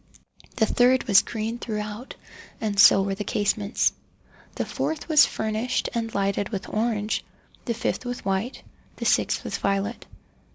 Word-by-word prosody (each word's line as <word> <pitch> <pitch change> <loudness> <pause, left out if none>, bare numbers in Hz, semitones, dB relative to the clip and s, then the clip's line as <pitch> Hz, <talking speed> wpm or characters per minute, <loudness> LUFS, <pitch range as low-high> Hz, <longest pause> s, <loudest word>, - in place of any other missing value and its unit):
The 220 - +3
third 250 +3 +3
was 200 -6 +6
green 225 +1 -4
throughout, 215 +2 -5 0.4
and 205 -2 -2
so 195 -1 +8
were 195 0 -1
the 205 +2 -4
casements. 205 +1 0 0.6
The - - -2
fourth 315 - -3
was 310 -2 +6
furnished 220 +4 -2
and 230 -2 -2
lighted 200 0 0
with 195 -4 -5
orange—the 220 +2 -3
fifth 235 - -2
with 245 -3 -5
white—the 195 +6 -5
sixth - - +2
with - - -3
violet. 200 +3 -1
215 Hz, 135 wpm, -25 LUFS, 200-240 Hz, 0.6 s, so